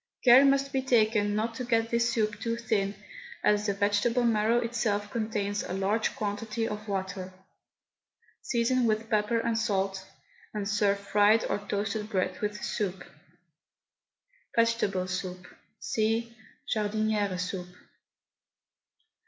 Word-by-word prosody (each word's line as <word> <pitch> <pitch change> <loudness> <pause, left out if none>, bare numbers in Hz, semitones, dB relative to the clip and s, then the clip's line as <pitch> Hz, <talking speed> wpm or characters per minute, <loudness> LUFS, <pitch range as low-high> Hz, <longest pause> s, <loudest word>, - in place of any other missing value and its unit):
Care 250 +2 +9
must 275 0 +2
be 265 - +1
taken 215 -5 +2
not 225 +2 -1
to 250 - -5
get 230 -1 +1
this 235 0 +2
soup 215 -2 -1
too 230 0 -2
thin, 210 -4 -1 0.5
as 210 0 +2
the 200 - +1
vegetable 205 +5 +1
marrow 225 0 +3
itself 225 -3 -1
contains 210 -3 -2
a - - -5
large 200 +4 0
quantity 215 +2 -2
of 210 +1 -6
water. 190 -1 -3 1.1
Season 240 +1 +1
with 220 +1 -1
pepper 215 +2 +2
and 230 0 0
salt, 195 -3 -1 0.5
and 205 -1 -2
serve 205 -1 +2
fried 205 +2 +3
or - - -1
toasted 205 +1 -3
bread 185 -3 -1
with 210 0 -2
the - - -10
soup. 190 -3 -2 1.5
VEGETABLE 230 -5 +1
SOUP. 185 -1 -4 0.3
(See 225 +1 -1 0.3
JARDINIERE 210 -2 0
SOUP.) 180 0 -4
215 Hz, 130 wpm, -28 LUFS, 200-230 Hz, 1.5 s, Care